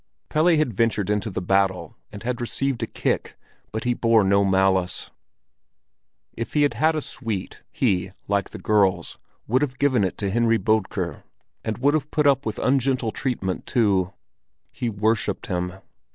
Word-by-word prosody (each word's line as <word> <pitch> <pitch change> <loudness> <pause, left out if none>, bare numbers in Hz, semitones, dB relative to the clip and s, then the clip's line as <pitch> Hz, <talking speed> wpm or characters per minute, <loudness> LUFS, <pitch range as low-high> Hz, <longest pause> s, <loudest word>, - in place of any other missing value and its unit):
Pelle 155 +3 +2
had 150 -6 +1
ventured 105 -2 +1
into 105 +1 0
the 95 -2 -4
battle 95 -3 +1 0.2
and 105 0 -9
had 120 0 -2
received 135 +1 -1
a - - -1
kick, - - -2 0.3
but 110 0 -3
he 125 - +1
bore 115 -2 +3
no 100 +1 +3
malice. 95 -2 +1 1.2
If 115 - -5
he 150 - +4
had 145 - +2
had 160 +1 +2
a 155 - -1
sweet, 110 -7 -5
he, 95 -6 0 0.2
like 100 -1 0
the - - -8
girls, 95 -5 +1 0.3
would 130 +5 +2
have 130 -3 -2
given 130 -6 +2
it 95 - -2
to 100 -2 -2
Henry 115 +1 +3
Bodker, 110 -2 -1 0.4
and 110 - -3
would 140 +3 +2
have 150 -1 0
put 150 -2 +1
up 140 -3 +3
with 110 - -3
ungentle 130 -3 +1
treatment 105 -9 -3
too. 100 -6 +2 0.6
He 120 - -3
worshipped 105 -1 0
him. 90 -1 -2
110 Hz, 165 wpm, -24 LUFS, 95-125 Hz, 1.2 s, he